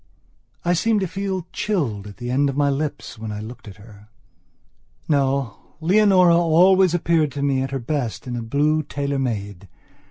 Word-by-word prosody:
I 175 - +3
seemed 210 +4 +1
to 190 - -1
feel 190 -1 -3
chilled 125 - -2
at 100 -2 -11
the 120 +3 -5
end 140 +2 +2
of 135 - -4
my 145 -1 +2
lips 145 -4 -4
when 110 -1 -5
I 105 - -5
looked 110 +2 -9
at 100 - -10
her... 105 0 -16 1.0
No, 135 -6 -1
Leonora 185 0 +4
always 175 +2 +4
appeared 165 -3 +1
to 140 0 -3
me 135 -2 +1
at 135 - -2
her 135 - -3
best 125 -2 -3
in 125 -1 -4
a 120 - -3
blue 145 +7 +1
tailor 140 -1 -3
made. 100 -6 -4
140 Hz, 180 wpm, -22 LUFS, 120-170 Hz, 1.0 s, Leonora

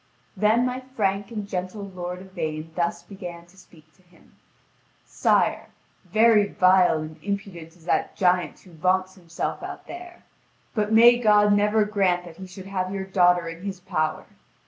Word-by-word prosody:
Then 215 +5 +3
my 250 0 -2
frank 205 -7 -2
and 210 -3 -5
gentle 185 +2 -4
lord 180 -2 -6
Yvain 160 -4 -5
thus 170 0 -2
began 175 -4 -9
to 175 +2 -23
speak 155 -4 -20
to 190 - -28
him: 175 -1 -25 0.7
"Sire, - - +1 0.4
very 220 -2 +4
vile 185 -3 +4
and 155 0 -8
impudent 190 -5 -5
is 165 -2 -21
that - - 0
giant 180 -4 +1
who 185 - -18
vaunts 185 +3 0
himself 170 -3 -5
out - - -8
there. 350 0 -10 0.5
But 210 -2 -1
may 235 +2 +7
God 210 -2 +4
never 210 +1 +3
grant 190 -4 +1
that 170 -2 -12
he 190 - -9
should 185 +1 -11
have 185 -1 -3
your 195 -1 -4
daughter 180 -2 +3
in 165 +1 -8
his 195 -2 -5
power! 155 -4 -2
190 Hz, 165 wpm, -24 LUFS, 175-210 Hz, 0.7 s, may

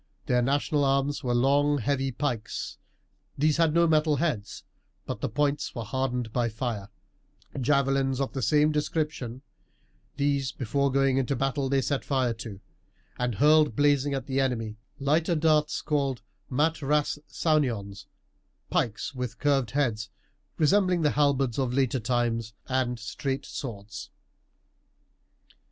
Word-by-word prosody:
Their 125 -1 +2
national 145 +3 +1
arms 140 +1 +1
were 120 -1 0
long 145 +4 +3
heavy 135 +1 0
pikes 120 -4 -3 0.6
these 150 +2 +2
had 165 -2 +3
no 170 +2 +4
metal 155 -2 +3
heads, 140 -9 -2 0.4
but - - -5
the - - -1
points 145 0 -1
were 115 - -3
hardened 125 -1 -2
by 120 -2 +1
fire; 110 -3 -4 0.7
javelins 135 0 +2
of 135 - -2
the 135 - -3
same 150 +7 +3
description 150 -5 -2 0.7
these 140 -2 +1
before 140 +3 0
going 135 0 +2
into 135 +1 0
battle 135 +1 -1
they 135 -1 +2
set 140 0 -1
fire 130 -4 +1
to, 110 -4 -8 0.6
and 125 -2 0
hurled 150 -1 +4
blazing 145 0 +2
at 135 - -4
the 135 -1 -1
enemy 115 -5 -1 0.2
lighter 160 +5 +2
darts 155 -1 +2
called 140 -6 -1 0.3
mat 155 +5 +1
ras 150 +1 +1
saunions, 120 -11 -1 0.6
pikes 110 +4 -1
with 125 -4 -4
curved 140 -3 +1
heads, 115 -7 -1 0.5
resembling 180 +1 +3
the 150 - +3
halberds 140 -4 +1
of 125 -2 0
later 130 -1 +1
times; 115 -1 -1
and 130 -2 0
straight 135 +5 -4
swords. 110 -5 -7
135 Hz, 135 wpm, -27 LUFS, 120-145 Hz, 0.7 s, no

